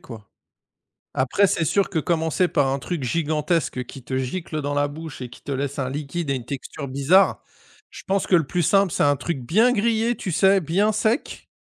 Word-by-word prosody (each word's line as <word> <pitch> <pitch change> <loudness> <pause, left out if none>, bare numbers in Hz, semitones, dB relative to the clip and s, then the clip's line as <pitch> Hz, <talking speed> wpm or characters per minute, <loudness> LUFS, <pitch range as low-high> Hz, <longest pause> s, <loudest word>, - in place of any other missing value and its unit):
quoi. 110 -4 -11 0.9
Après 135 +10 +2
c'est 170 -4 0
sûr 200 +5 +1
que 165 - -2
commencer 165 +3 +1
par 145 -3 +2
un 135 +1 0
truc 165 -1 -4
gigantesque 155 -1 -1
qui 130 +1 -11
te 130 +1 -3
gicle 155 +4 -3
dans 145 0 -2
la 145 0 +1
bouche 155 -3 -8
et 125 - -5
qui - - -14
te 140 - -5
laisse 140 +1 -3
un 130 -1 -1
liquide 145 +2 -4
et - - +1
une 125 -3 -5
texture 140 +2 -6
bizarre, 140 +9 +3 0.5
je - - -11
pense 195 -1 0
que - - +1
le 165 -4 +4
plus 175 +5 -1
simple, 195 +1 +3
c'est - - +1
un 145 0 +3
truc 155 +1 -3
bien 215 - +3
grillé, 230 +1 +1
tu 185 - -4
sais 195 +3 +4
bien 185 +7 +1
sec 220 +5 -1
160 Hz, 210 wpm, -23 LUFS, 140-190 Hz, 0.9 s, le